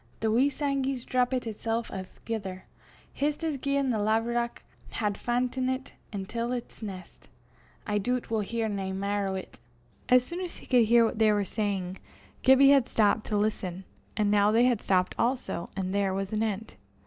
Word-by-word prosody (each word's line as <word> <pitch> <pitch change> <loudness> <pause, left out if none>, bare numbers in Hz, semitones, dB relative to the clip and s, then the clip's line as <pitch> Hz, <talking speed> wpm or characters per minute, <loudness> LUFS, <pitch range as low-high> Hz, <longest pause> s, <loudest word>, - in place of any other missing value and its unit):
the 220 -1 +1
wee 255 +6 +4
sangie's 275 -3 -1
drappit 250 0 +1
itsel' 225 +1 -2
a'thegither, 190 0 -6 0.5
jist 295 +3 -1
as 315 -3 0
gien 275 -1 +1
the 220 - 0
laverock 230 +3 0 0.3
had 210 -3 0
fa'ntit 255 +3 -1 0.2
intil 230 +4 -3
'ts 235 - -15
nest. 190 -4 -9 0.6
I 210 -1 0
doobt 245 +3 -2
we'll 220 - +2
hear 225 +2 -1
nae 195 -2 -3
mair 200 +1 -1
o' 190 0 -2
't." 185 - -12 0.5
As 250 0 +6
soon 345 +5 -5
as 360 -2 -5
he - - -13
could 245 -3 +4
hear 235 +1 +5
what 225 - -2
they 220 -1 +5
were 205 -1 +2
saying, 195 -2 -2 0.4
Gibbie 265 +1 +7
had 270 -3 +4
stopped 215 0 +2
to 210 - 0
listen; 195 -3 -1 0.3
and 210 -1 +2
now 205 0 +4
they 230 +2 +4
had 245 -4 +3
stopped 185 -1 +1
also, 235 -8 -1
and 190 -1 -2
there 200 -1 +1
was 195 +1 -3
an 215 - 0
end. 220 0 -2
225 Hz, 175 wpm, -28 LUFS, 200-250 Hz, 0.6 s, Gibbie